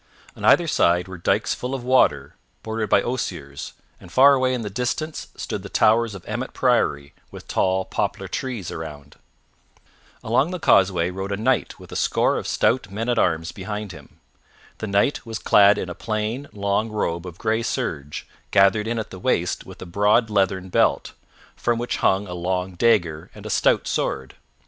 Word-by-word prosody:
On - - -11
either - - +5
side 90 +1 +2
were 95 -1 -9
dikes - - +1
full 125 +2 -4
of 130 - -6
water 75 - +2 0.3
bordered 110 -1 -3
by 100 - +4
osiers, 85 - -4 0.3
and 90 - -14
far 140 +5 +7
away 130 -1 +2
in 125 -2 -2
the 105 - -4
distance 125 +8 -3
stood - - -4
the - - -9
towers 110 -1 +3
of 95 - -11
Emmet - - -4
Priory 70 0 +1 0.2
with - - -12
tall 95 0 +1
poplar 100 -1 -2
trees 120 -3 -4
around. 75 -3 -8 1.1
Along 125 +8 +2
the 180 0 -4
causeway 90 - +3
rode 95 +2 -5
a 100 - -1
knight 125 +4 0
with - - -13
a - - -7
score - - +1
of - - -4
stout 120 -5 +1
men 110 +5 -3
at 120 - +2
arms 80 0 +1
behind 105 +1 -5
him. 75 -5 -14 0.6
The 110 - -4
Knight 100 +8 +1
was 115 -2 -5
clad 100 -1 +5
in - - -3
a 90 - -5
plain, 110 +7 -3
long 100 +2 -1
robe 90 -5 -2
of 85 -1 -9
gray 110 +2 0
serge, 75 -9 -4 0.2
gathered 100 +2 +4
in 115 +1 -1
at 110 - -4
the 95 - -9
waist 90 -5 -1
with - - -11
a - - -9
broad 105 +5 +2
leathern 95 -2 0
belt, - - +1 0.4
from 120 -1 0
which 120 +1 -2
hung 95 +2 +2
a 90 - -7
long 90 +1 -2
dagger 85 -6 +1
and - - -12
a - - -4
stout - - +2
sword. 65 -1 -2
100 Hz, 185 wpm, -23 LUFS, 90-115 Hz, 1.1 s, far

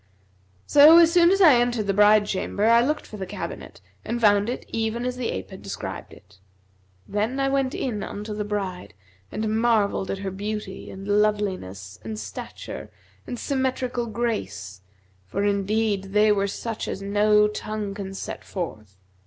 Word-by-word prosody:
So 300 +3 +8
as 335 -1 +7
soon 345 -1 +6
as 390 +2 +3
I 320 -6 +8
entered 240 -3 0
the 200 - +1
bride 210 +1 +5
chamber, 200 +1 -2
I 230 +1 +6
looked 300 +4 -1
for 215 - -10
the 190 -2 -5
cabinet 205 +2 -7 0.2
and 235 - -3
found 205 -1 +4
it 245 - -4
even 225 +2 -2
as 250 0 -2
the 250 -2 -3
ape 95 0 -5
had - - -10
described - - -6
it. - - -18 0.7
Then 220 +6 -1
I 270 0 +2
went 270 -1 0
in 225 -6 -2
unto 210 +1 -5
the 210 0 -3
bride 195 - -4 0.4
and 220 0 -1
marvelled 215 -5 +2
at - - -2
her 195 0 -4
beauty 205 0 -5
and 195 +1 -9
loveliness 195 - -1
and 110 -1 -5
stature 105 -3 -7 0.4
and 245 - -4
symmetrical 255 -2 -1
grace, 100 - -3 0.5
for 200 - -2
indeed 205 0 0
they 210 +2 +3
were 200 -1 +2
such 225 +2 -4
as 195 - -4
no 210 +1 +4
tongue 210 -1 -4
can 195 -1 -6
set - - -6
forth. 110 - -6
210 Hz, 170 wpm, -24 LUFS, 195-235 Hz, 0.7 s, So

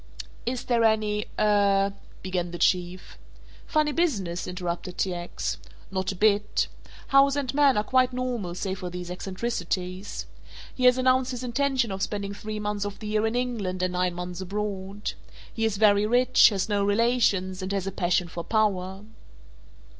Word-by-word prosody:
"Is 245 0 -1
there 235 -2 +2
any 215 -1 +2
er 200 -1 +3
?" - - -23
began 180 -2 -2
the 175 - -6
Chief. 180 - 0 0.5
"Funny 305 -1 +2
business?" 205 - -1
interrupted 180 0 -4
T. 185 - 0
X., 175 0 -4 0.3
"not 190 0 -1
a - - -6
bit. 210 +1 +2 0.4
House 275 0 +5
and 280 -3 -2
man 280 -3 +4
are 210 - +2
quite 255 +2 +3
normal 245 -8 -3
save 190 +1 -3
for 180 -1 -4
these 180 0 -6
eccentricities. 185 -1 -3 0.5
He 255 - -1
has 250 0 +6
announced 255 0 +3
his 250 -1 -4
intention 255 -2 0
of 190 0 -4
spending 200 0 -2
three 215 +1 -5
months 210 -1 -2
of 205 -1 -5
the 215 - -9
year 215 +1 +1
in 225 - -2
England 215 -7 -2
and 185 0 0
nine 180 -1 0
months 180 +1 -5
abroad. 200 +1 -4 0.4
He 225 - 0
is 215 -3 0
very 205 0 +4
rich, 245 +2 +6
has 200 -4 -1
no 205 -2 +1
relations, 205 -3 +2
and 185 +1 -3
has 195 -2 -1
a 195 - -2
passion 180 -1 +1
for 170 0 -6
power." 195 -2 0
205 Hz, 170 wpm, -26 LUFS, 185-235 Hz, 0.5 s, has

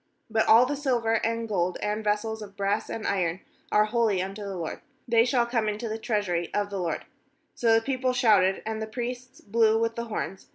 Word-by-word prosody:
19But 220 0 +3
all 230 +3 +7
the 290 +3 -2
silver, 240 -6 0
and 230 0 -1
gold, 180 -4 0
and 210 +1 -2
vessels 215 +1 -1
of 200 -1 -10
brass 200 +1 -1
and 225 - -5
iron, 180 -2 0 0.3
are 210 0 +4
holy 220 -3 +1
unto 195 +3 -4
the 200 -1 -5
LORD; 165 -2 -5 0.3
they 230 -1 +5
shall 245 -1 +2
come 230 -3 0
into 210 +3 -4
the 220 0 -4
treasury 205 -7 -1
of 205 0 -1
the 200 - -3
LORD/ 170 -3 -2 0.5
20So 230 -2 +3
the 225 - +4
people 260 -1 0
shouted, 210 -7 +3
and 220 0 -3
[the 220 - -3
priests] 245 +3 -6
blew 220 +1 +3
with 230 0 0
the 235 - -3
horns. 195 -4 -5
220 Hz, 210 wpm, -27 LUFS, 200-235 Hz, 0.5 s, all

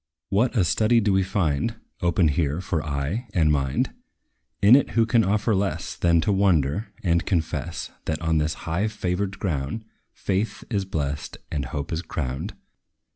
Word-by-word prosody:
What 115 +5 +2
a 100 - +5
study 110 +7 +3
do 105 -3 +2
we 95 - +4
find 95 +1 0 0.3
Opened 85 -2 +3
here 75 +1 0
for 85 -4 -2
eye 75 - -2
and 80 -4 +4
mind! 70 -3 0 0.7
In 105 +5 +8
it 140 - +3
who 115 - +5
can 115 0 +3
offer 105 +3 +1
less, 100 0 -1
Than 85 -1 +3
to 90 - +1
wonder, 95 0 +2
and 85 -2 +2
confess, 85 -5 -2
That 80 -1 -1
on 80 -1 +1
this 75 +1 0
high 85 +6 0
favored 95 -2 -2
ground, 80 +4 -2 0.3
Faith 100 +2 -2
is 100 -3 0
blest, 75 -5 -3
and 70 -3 -1
hope 70 +4 -4
is 80 - -1
crowned. 70 -6 -4
90 Hz, 165 wpm, -25 LUFS, 75-100 Hz, 0.7 s, In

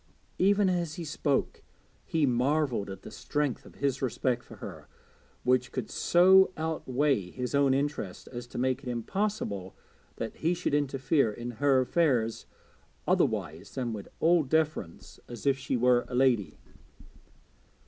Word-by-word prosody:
Even 200 +1 +4
as 175 -4 -1
he 170 - -6
spoke 145 -2 -1 0.4
he 160 -2 +1
marvelled 125 -3 +1
at 95 - -8
the - - -9
strength 145 -4 -2
of - - -16
his 140 -1 -1
respect 125 -1 -1
for - - -13
her, - - -9 0.6
which 125 0 +2
could 125 -4 -4
so 190 +2 +5
outweigh 145 - 0
his 125 +6 -5
own 140 -1 +4
interest 140 -9 -3
as 120 -1 -7
to - - -9
make 130 +1 0
it 130 - -6
impossible 120 - -3 0.4
that 115 - -5
he 170 +3 +1
should 175 -4 -2
interfere 140 -3 +1
in 120 +3 -6
her 135 +2 +3
affairs 125 -6 +1 0.6
otherwise - - 0
than 125 -3 -2
with 105 -2 -7
all 170 +1 +4
deference, 155 - -2
as 120 +1 -9
if 140 -1 +4
she 135 -1 -1
were 125 0 +3
a 125 - -5
lady. 125 -5 +2
135 Hz, 150 wpm, -29 LUFS, 120-155 Hz, 0.6 s, so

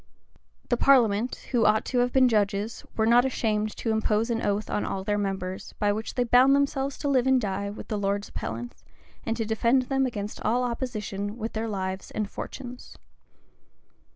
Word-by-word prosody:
The 240 - +2
parliament, 240 -4 +3
who 240 -3 +3
ought 215 +1 +3
to 250 - 0
have 245 0 +2
been 260 0 +5
judges, 210 -1 0
were 220 - +3
not 240 +2 +6
ashamed 215 -5 -1
to 225 - -1
impose 220 +1 +1
an 230 0 -1
oath 205 +1 -1
on 210 - -1
all 190 - -3
their 205 +1 0
members, 190 -2 -4
by 205 -1 +2
which 220 +2 -5
they 245 - +2
bound 250 +3 +5
themselves 275 -1 0
to 290 - -3
live 260 -2 +2
and 265 -1 +5
die 200 -2 -2
with 205 - -8
the 210 - -2
lords 200 0 -1
appellants, 115 -7 -6 0.4
and 225 0 0
to 225 - -1
defend 235 +4 +2
them 270 +1 +1
against 210 -4 -5
all 240 +3 +1
opposition 215 -4 -3
with 225 -1 -4
their 225 +1 -2
lives 190 -2 -4
and 215 -1 -2
fortunes. 250 -2 -8
220 Hz, 185 wpm, -26 LUFS, 205-245 Hz, 0.4 s, not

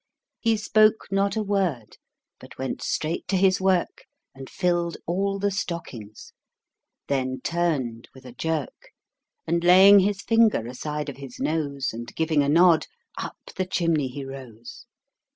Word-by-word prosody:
He 225 -1 +1
spoke 215 +1 +3
not 195 +1 +1
a 220 - -1
word, 185 - -2 0.4
but - - -14
went 130 0 -4
straight 160 +2 -2
to 195 - +1
his 185 0 +3
work, 185 -2 0 0.3
And 135 0 -10
filled 175 -2 -1
all 195 +3 -1
the 200 +1 0
stockings; 140 - -6 0.7
then 130 -2 -1
turned 140 -10 -2
with 130 0 -15
a 125 - -9
jerk, 155 +1 -4 0.5
And 170 +1 0
laying 190 +3 +8
his 200 +1 0
finger 225 - +3
aside 150 +5 -5
of 140 - -7
his 135 -3 -10
nose, 140 -5 -2
And 120 +1 -8
giving 160 -2 +1
a 140 - 0
nod, 170 +1 +5 0.3
up - - -6 0.2
the 185 - -1
chimney 165 -6 0
he 135 +2 -7
rose. 125 -4 -11
165 Hz, 150 wpm, -24 LUFS, 135-190 Hz, 0.7 s, laying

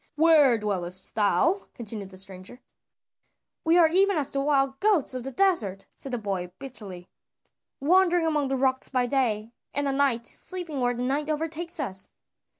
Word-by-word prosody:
"Where 300 -6 +5
dwellest 185 -4 -1
thou?" 220 - +1
continued 215 -4 -6
the 190 - -11
stranger. 190 +5 -8 1.0
"We 330 +2 +4
are 335 -2 +7
even 385 +3 +3
as 285 -3 -1
the 275 - 0
wild 275 -2 +1
goats 400 -11 +3
of 255 - -4
the 270 - -5
desert," 250 - +1
said 270 - -7
the 245 - -1
boy 195 -5 -4
bitterly, 210 -9 -9 0.7
"wandering 350 +3 +3
among 300 -3 +1
the 270 0 -1
rocks 260 0 +1
by 255 -2 +1
day, 235 -4 -1 0.2
and 285 0 0
at 275 - 0
night 270 -4 +1
sleeping 345 -3 -6
where 245 -1 +1
the 245 - -3
night 285 +4 -1
overtakes 325 +2 -2
us." 190 -9 -2
270 Hz, 165 wpm, -26 LUFS, 215-315 Hz, 1.0 s, are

